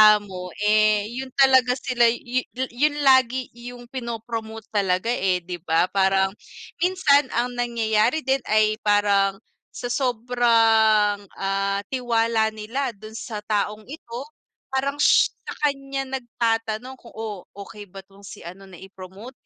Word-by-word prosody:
amo, 190 -3 -6 0.2
eh, 215 0 +3
yun 260 +2 -5
talaga 260 -2 +5
sila 245 -2 +2
yun 245 +2 -1 0.3
yun 290 +5 +1
lagi 260 -2 +3
yung 245 +1 -10
pinopromote 225 -3 -6
talaga, 200 +2 0
eh, 185 -6 0
di 175 0 -6
ba? 165 +3 +1
Parang, 190 0 +2 0.5
minsan 325 -6 +3
ang 240 +2 0
nangyayari 235 +2 0
din 265 +1 +1
ay 215 0 +2
parang 205 -2 +2 0.4
sa 245 -1 -4
sobrang, 225 -4 +3 0.2
ah, 195 0 -1
tiwala 230 -3 +1
nila 230 +3 -3
dun 215 +2 -12
sa 215 -3 -6
taong 210 0 -2
ito, 240 -6 -8 0.5
parang 270 +1 -1
sh - - +5 0.2
sa - - -5 0.2
kanya 275 0 -5 0.2
nag-tatanong 230 +1 -2
kung 235 - -16
oo 215 -4 -6
okay 205 +1 -10
ba 195 +1 -11
tong 195 +1 -21
si 200 - -11
ano 185 +3 -10
na 190 - -13 0.2
promote 190 +6 -11
225 Hz, 135 wpm, -23 LUFS, 205-250 Hz, 0.5 s, talaga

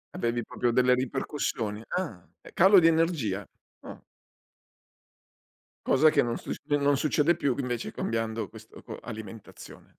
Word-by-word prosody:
Avevi 120 0 -1
proprio 120 -1 -1
delle 125 +1 +4
ripercussioni? 120 -4 -2
Ah, 115 - -4 0.3
calo 190 +2 +7
di 165 - +2
energia. 160 - 0 0.3
Ah. - - -11 1.9
Cosa 155 +4 +5
che - - +3
non 120 -1 -2
succe - - -7 0.2
non 140 0 +2
succede 155 +3 +2
più 140 -6 -1
invece 120 -3 -3
cambiando 115 -2 -3
questo - - -14
quo - - -9
alimentazione. 110 -2 -10
125 Hz, 125 wpm, -27 LUFS, 115-150 Hz, 1.9 s, calo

